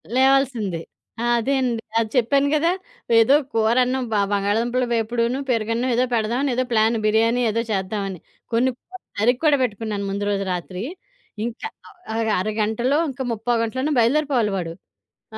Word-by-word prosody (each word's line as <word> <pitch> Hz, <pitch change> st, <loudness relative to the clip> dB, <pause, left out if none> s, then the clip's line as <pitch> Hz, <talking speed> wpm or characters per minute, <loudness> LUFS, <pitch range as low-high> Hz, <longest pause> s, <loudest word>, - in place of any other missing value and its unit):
లేవాల్సిందే. 260 Hz, -9 st, +2 dB, 0.4 s
ఆ! -, -, -1 dB, 0.2 s
అదే 265 Hz, +5 st, 0 dB
అండి. 240 Hz, -3 st, -1 dB, 0.2 s
అది 225 Hz, -1 st, -1 dB
చెప్పాను 275 Hz, +4 st, +3 dB
గదా! 330 Hz, +3 st, +2 dB, 0.5 s
ఏదో 230 Hz, +5 st, +6 dB, 0.2 s
కూరన్నాం 250 Hz, +4 st, +2 dB
బ -, -, 0 dB, 0.2 s
బంగాళదుంపల 225 Hz, +5 st, +1 dB
వేపుడును, 235 Hz, +2 st, 0 dB
పెరుగన్నాం 230 Hz, +1 st, 0 dB
ఏదో 245 Hz, -, +3 dB
పెడదాం 235 Hz, +5 st, 0 dB
ఏదో 255 Hz, +1 st, +1 dB
ప్లాను. 225 Hz, 0 st, +3 dB
బిర్యానీ 225 Hz, +3 st, +3 dB
ఏదో 230 Hz, +2 st, 0 dB
చేద్దావని. 195 Hz, -1 st, -2 dB, 0.3 s
కొన్ని 240 Hz, +3 st, +2 dB
కూరలు 370 Hz, +7 st, -14 dB
తరిగి 245 Hz, +4 st, +3 dB
కూడా 295 Hz, -2 st, +5 dB
పెట్టుకున్నాను 210 Hz, -3 st, -3 dB
ముందు 200 Hz, +1 st, -2 dB
రోజు 200 Hz, -1 st, 0 dB
రాత్రి. 180 Hz, +2 st, -5 dB, 0.6 s
ఇంకా 240 Hz, -, -5 dB, 0.5 s
ఒక 225 Hz, -, 0 dB
అర 190 Hz, +4 st, -1 dB
గంటలో 235 Hz, +6 st, +1 dB
ఇంకా 265 Hz, 0 st, -5 dB
ముప్పావు 230 Hz, +1 st, 0 dB
గంటలోనో 260 Hz, +6 st, -1 dB
బయలుదేరిపోవాలి 245 Hz, -2 st, +2 dB
వాడు. 165 Hz, -3 st, -4 dB, 0.6 s
ఆ! -, -, -5 dB
230 Hz, 150 wpm, -22 LUFS, 215-255 Hz, 0.6 s, ఏదో